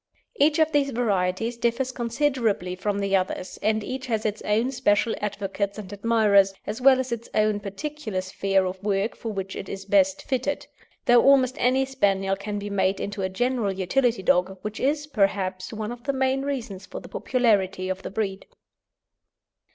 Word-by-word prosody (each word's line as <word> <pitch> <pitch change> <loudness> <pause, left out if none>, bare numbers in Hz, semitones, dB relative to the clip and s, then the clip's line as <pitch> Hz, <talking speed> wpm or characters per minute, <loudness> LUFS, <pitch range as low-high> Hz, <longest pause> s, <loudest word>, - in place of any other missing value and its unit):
Each 300 -1 +4
of 315 -1 +3
these 285 -2 +2
varieties 225 -2 0
differs 240 +2 0
considerably 235 -6 0
from 200 +2 -2
the 200 -1 +1
others, 185 0 -2
and 215 0 +1
each 260 +4 -5
has 220 -3 -1
its 215 0 -1
own 225 +5 +1
special 230 -4 +2
advocates 200 0 -3
and 205 -2 -7
admirers, 205 -2 +3
as 215 +4 -4
well 260 0 +6
as 260 -1 -3
its 235 0 -4
own 215 -1 +2
particular 215 0 -4
sphere 190 +1 0
of 185 0 -4
work 205 +1 0
for 225 - -5
which 195 -2 -5
it - - -6
is 195 0 -6
best 285 +5 +3
fitted, 265 +2 -2 0.4
though 240 -1 +6
almost 265 -2 +5
any 260 +2 +3
Spaniel 195 -7 +1
can 205 +1 -5
be 205 0 -5
made 190 -1 +1
into 205 0 -4
a 190 - 0
general 240 +1 0
utility 195 +4 0
dog, 185 +2 +2
which 210 +1 -5
is, 290 +3 0
perhaps, 195 -7 0
one 215 0 -4
of 240 +1 -9
the 275 - 0
main 265 0 +1
reasons 240 -9 -4
for - - -7
the - - -12
popularity 200 -7 +1
of 190 0 -3
the - - -6
breed. 195 -1 -3
215 Hz, 180 wpm, -25 LUFS, 195-255 Hz, 0.4 s, well